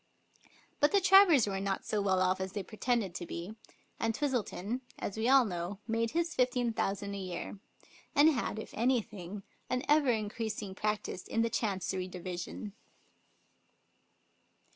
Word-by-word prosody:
But 290 - +4
the 400 - +6
Travers 385 - +7
were 195 -2 -2
not 195 0 -2
so 210 - 0
well 190 -2 +2
off 185 +1 +1
as 190 0 -4
they 200 - -3
pretended 220 -3 -1
to 175 -1 -5
be, 175 +5 -6 0.5
and 225 -1 0
Twistleton, 245 -4 -2 0.2
as 195 - -4
we 220 +3 0
all 265 -2 +7
know, 180 0 -4
made 230 0 0
his 335 +3 -1
fifteen 250 -2 +1
thousand 200 -1 -2
a 200 - -4
year, 185 +1 -5 0.6
and 295 +2 +7
had, 250 -7 -1
if 220 - -7
anything, 210 -5 -1 0.3
an 250 +1 0
ever 295 -2 +4
increasing 215 -2 -2
practice 210 -2 -3
in 225 - +1
the 230 - 0
Chancery 190 -3 -1
Division. 180 +3 -6
215 Hz, 150 wpm, -32 LUFS, 190-250 Hz, 0.6 s, Travers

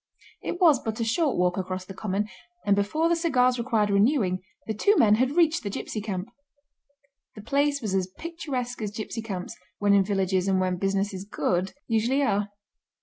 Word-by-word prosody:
It 350 - -4
was 320 -8 +6
but 220 -1 -4
a - - +1
short 275 +5 +1
walk 180 +1 +2
across 185 0 -3
the 195 - -9
common, 205 +1 -2 0.4
and 200 -1 +4
before 210 +12 +1
the 340 - +3
cigars 255 -7 +2
required 225 -4 +1
renewing 200 -3 +2 0.2
the 220 - -2
two 405 - +3
men 210 -2 +5
had 255 +6 +2
reached 330 -1 +4
the 205 - -4
gipsy 210 +2 -4
camp. 200 0 -4 1.1
The 210 - -10
place 280 +3 +1
was 205 -3 -2
as 190 -1 +1
picturesque 255 - -5
as 210 - -2
gipsy 215 +2 -5
camps—when 200 0 -3
in 200 -1 +5
villages 190 -1 0
and 190 -1 +2
when 185 -1 0
business 195 +2 0
is 190 0 -5
good—usually 225 +7 0
are. 205 -4 +1
210 Hz, 180 wpm, -26 LUFS, 195-260 Hz, 1.1 s, was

